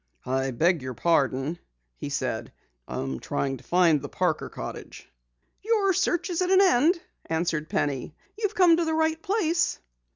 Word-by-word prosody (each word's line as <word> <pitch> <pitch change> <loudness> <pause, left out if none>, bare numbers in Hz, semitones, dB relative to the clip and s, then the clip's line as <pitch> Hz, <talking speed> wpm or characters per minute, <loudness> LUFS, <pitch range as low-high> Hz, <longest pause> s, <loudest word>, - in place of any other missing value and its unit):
"I 130 +1 0
beg 165 +6 +2
your 130 -1 -6
pardon," 145 +1 +1 0.4
he - - -6
said, - - -3 0.4
"I - - -5
am 65 -1 -3
trying 135 -1 -2
to - - -17
find 170 -5 +3
the - - -7
Parker 180 -4 -1
cottage." - - -8 0.5
"Your 415 -3 +2
search 350 +1 0
is 345 - -1
at 365 - +1
an 380 0 +6
end," 340 -1 +4 0.3
answered 160 -1 -1
Penny. 140 +1 -2 0.2
"You've 420 -1 -2
come 350 -3 +6
to 340 - +1
the 320 0 0
right 320 0 +1
place." 360 -5 +1
180 Hz, 165 wpm, -26 LUFS, -, 0.5 s, an